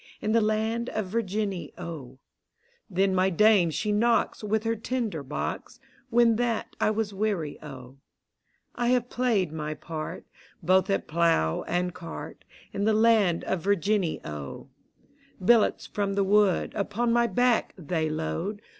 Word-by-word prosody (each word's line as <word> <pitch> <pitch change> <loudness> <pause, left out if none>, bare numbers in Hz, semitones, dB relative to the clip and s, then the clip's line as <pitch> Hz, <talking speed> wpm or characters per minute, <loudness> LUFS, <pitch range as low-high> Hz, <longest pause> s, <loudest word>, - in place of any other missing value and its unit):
In 215 - -2
the 230 +1 +4
land 220 +2 0
of 215 -4 -3
Virginny, 205 -3 -2
O: 155 -7 -8 0.7
Then 190 0 +1
my 185 +1 +3
Dame 195 -1 +4
she 210 +8 -2
knocks 230 +1 +1
With 215 +1 0
her 225 0 0
tinder 225 - -3
box. 140 +2 -5 0.3
When 235 -2 +4
that 235 -2 -1
I - - +3
was 215 -1 -1
weary, 195 -7 -2
O. 135 -3 -10 0.8
I 240 -1 -1
have 245 0 +1
played 225 -9 +1
my 155 -1 -4
part 155 -1 -6 0.4
Both 185 +3 +3
at 195 - 0
Plow 160 - +2
and 180 0 -1
Cart, 165 -2 -8 0.3
In 200 - -1
the 220 0 +3
land 215 -6 +3
of 190 - -2
Virginny, 200 -1 +1
O: 75 -2 -7 0.7
Billats 220 +3 +3
from 200 -1 -2
the 200 -1 +2
VV^ood, 205 -1 +3
Uf)on 225 +3 -1
my 235 0 +3
back 245 -1 +1
they 160 -2 -2
load. 165 +6 -3
200 Hz, 145 wpm, -27 LUFS, 170-220 Hz, 0.8 s, the